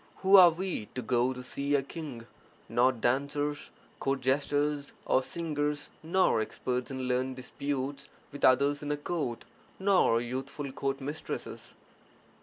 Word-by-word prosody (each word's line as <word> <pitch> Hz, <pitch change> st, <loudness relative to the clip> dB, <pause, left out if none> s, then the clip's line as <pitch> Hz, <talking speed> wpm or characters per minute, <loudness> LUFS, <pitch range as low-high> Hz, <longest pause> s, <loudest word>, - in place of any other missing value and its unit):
Who 190 Hz, +1 st, +7 dB
are 185 Hz, -3 st, +10 dB
we 170 Hz, -, -3 dB
to 125 Hz, -, -3 dB
go 120 Hz, +2 st, +2 dB
to 125 Hz, -1 st, -6 dB
see 140 Hz, +2 st, -1 dB
a 140 Hz, -, +2 dB
king 140 Hz, -5 st, -7 dB, 0.2 s
— -, -, -31 dB
not 125 Hz, -1 st, +2 dB
dancers, 145 Hz, +3 st, 0 dB, 0.3 s
court 135 Hz, -1 st, -1 dB
jesters, 145 Hz, +2 st, 0 dB
or 130 Hz, -, +3 dB
singers, 150 Hz, -1 st, -2 dB
nor 170 Hz, -7 st, +2 dB
experts 125 Hz, +3 st, -3 dB
in 130 Hz, -1 st, -4 dB
(learned) 130 Hz, +1 st, 0 dB
disputes 135 Hz, +1 st, -4 dB, 0.2 s
with 145 Hz, -, -9 dB
others 140 Hz, +3 st, +4 dB
in 145 Hz, 0 st, -3 dB
a 145 Hz, -, 0 dB
court, 145 Hz, -6 st, -3 dB, 0.3 s
nor 190 Hz, -12 st, +4 dB
youthful 130 Hz, +3 st, -4 dB
court 135 Hz, 0 st, -2 dB
mistresses! 145 Hz, +4 st, -6 dB
140 Hz, 145 wpm, -30 LUFS, 130-150 Hz, 0.3 s, are